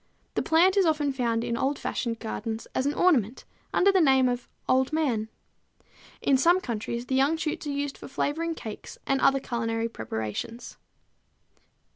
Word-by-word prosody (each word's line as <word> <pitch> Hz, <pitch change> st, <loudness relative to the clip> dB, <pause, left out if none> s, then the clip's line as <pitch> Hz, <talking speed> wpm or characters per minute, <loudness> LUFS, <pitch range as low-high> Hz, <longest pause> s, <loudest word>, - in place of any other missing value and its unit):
The -, -, 0 dB
plant 360 Hz, +5 st, +4 dB
is 390 Hz, -, +5 dB
often 295 Hz, -3 st, +1 dB
found 235 Hz, -3 st, 0 dB
in 235 Hz, -, -1 dB
old 270 Hz, +4 st, 0 dB
fashioned 230 Hz, -2 st, -2 dB
gardens 220 Hz, 0 st, -4 dB
as 260 Hz, -, 0 dB
an 290 Hz, -, -1 dB
ornamental 260 Hz, -, +2 dB, 0.2 s
under 395 Hz, +2 st, +4 dB
the 380 Hz, -2 st, +4 dB
name 265 Hz, -4 st, +5 dB
of 245 Hz, -1 st, -3 dB, 0.2 s
Old 260 Hz, +2 st, +3 dB
Man. 250 Hz, -9 st, 0 dB, 0.9 s
In 275 Hz, -, +4 dB
some 345 Hz, +7 st, +4 dB
countries 235 Hz, -, -4 dB
the 260 Hz, -, -4 dB
young 275 Hz, +5 st, +3 dB
shoots 310 Hz, -1 st, -3 dB
are -, -, -1 dB
used 285 Hz, 0 st, -3 dB
for -, -, -9 dB
flavoring 325 Hz, +5 st, -2 dB
cakes 220 Hz, -7 st, -8 dB
and 270 Hz, -1 st, +1 dB
other 275 Hz, 0 st, +4 dB
culinary 225 Hz, -2 st, -2 dB
preparations. 110 Hz, -, -5 dB
265 Hz, 165 wpm, -27 LUFS, 230-300 Hz, 0.9 s, is